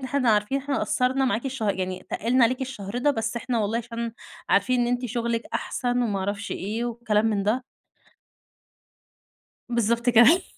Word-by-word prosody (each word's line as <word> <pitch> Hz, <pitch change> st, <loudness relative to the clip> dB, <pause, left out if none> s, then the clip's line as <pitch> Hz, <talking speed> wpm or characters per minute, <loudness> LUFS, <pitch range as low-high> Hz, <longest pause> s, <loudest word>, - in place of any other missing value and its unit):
إن 265 Hz, -, -6 dB
إحنا 260 Hz, -3 st, +1 dB
عارفين 210 Hz, +6 st, +2 dB
إحنا 275 Hz, 0 st, -2 dB
قصّرنا 260 Hz, +2 st, +1 dB
معاكِ 250 Hz, 0 st, 0 dB
الشه 240 Hz, -6 st, -1 dB
يعني 185 Hz, -1 st, -4 dB
تقلنا 240 Hz, +3 st, +3 dB
عليكِ 255 Hz, +3 st, 0 dB
الشهر 240 Hz, -4 st, -4 dB
ده، 290 Hz, +4 st, +3 dB
بس 225 Hz, -3 st, -2 dB
احنا 240 Hz, 0 st, -1 dB
والله 215 Hz, +2 st, 0 dB
عشان 235 Hz, -1 st, -4 dB, 0.4 s
عارفين 250 Hz, -1 st, +3 dB
إن 240 Hz, -, +2 dB
أنتِ 245 Hz, +1 st, -1 dB
شغلِك 235 Hz, 0 st, -1 dB
أحسن 245 Hz, 0 st, -1 dB
وما 205 Hz, -4 st, 0 dB
اعرفش 200 Hz, +1 st, -3 dB
إيه 215 Hz, +5 st, -3 dB
والكلام 225 Hz, -2 st, 0 dB
من 210 Hz, -3 st, +1 dB
ده. 225 Hz, +6 st, 0 dB, 2.1 s
بالضبط 235 Hz, 0 st, +1 dB
كده 240 Hz, +11 st, +6 dB
235 Hz, 165 wpm, -25 LUFS, 215-250 Hz, 2.1 s, كده